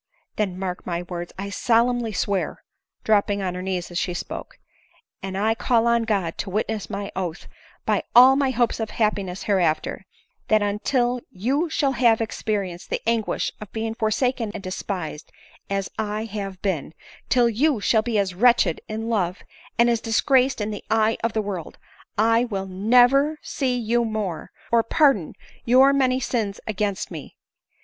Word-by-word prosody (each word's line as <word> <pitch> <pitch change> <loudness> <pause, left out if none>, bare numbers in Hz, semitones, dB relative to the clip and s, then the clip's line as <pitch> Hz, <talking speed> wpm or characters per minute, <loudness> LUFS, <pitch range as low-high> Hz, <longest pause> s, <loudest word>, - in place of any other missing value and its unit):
Then 195 -4 -1
mark 185 -1 -4
my 175 0 -3
words; 175 -1 -6
I 200 +1 -5
solemnly 235 +1 +2
swear," 200 0 -2 0.4
dropping 205 -2 +2
on 180 -1 -2
her 180 - -5
knees 185 -2 -3
as 175 - -1
she 180 - -2
spoke, - - -6 0.3
" 460 - -37
and 190 0 -4
I 215 +3 +2
call 230 0 +1
on 235 -1 +2
God 195 -7 -1
to 200 - -3
witness 215 +1 -2
my 200 -1 -4
oath, 180 -3 -4 0.4
by - - +2
all 255 +2 +9
my 275 -1 +2
hopes 240 -2 0
of 220 -1 -2
happiness 200 -4 -1
hereafter, 180 -6 0 0.4
that 215 -1 +3
until 240 +4 0
you 270 - -1
shall 285 -3 +1
have 235 -4 +3
experienced 205 -5 -3
the - - -2
anguish 230 -1 0
of 210 - -9
being 225 0 -2
forsaken 230 +1 0
and - - -6
despised 185 -4 -5 0.4
as 195 -1 -1
I 215 0 -2
have 200 -3 -6
been 165 -6 -2 0.2
— - - -23
till 245 -2 +4
you 250 +3 +2
shall 220 +2 +3
be 225 -1 -1
as 195 -2 0
wretched 235 -4 +3
in 220 +1 -4
love, 195 -5 -1 0.3
and 235 +1 +5
as 235 -1 +1
disgraced 255 +3 +2
in 210 0 -2
the 205 - -6
eye 220 0 +2
of 230 -1 0
the 220 - 0
world, 190 -5 -5 0.4
I 230 +3 +3
never 220 +8 +4
will 310 - -6
see 255 -3 -1
you 235 0 +1
more, 215 -7 -3 0.2
or 235 -1 +5
pardon 230 - +2 0.3
your 260 +3 +6
many 260 -2 +2
sins 220 -6 -2
against 205 -2 -2
me - - -5
— - - -7
1 - - -12
ADELINE - - -20
MOWBRAY. - - -61
215 Hz, 180 wpm, -23 LUFS, 195-235 Hz, 0.4 s, all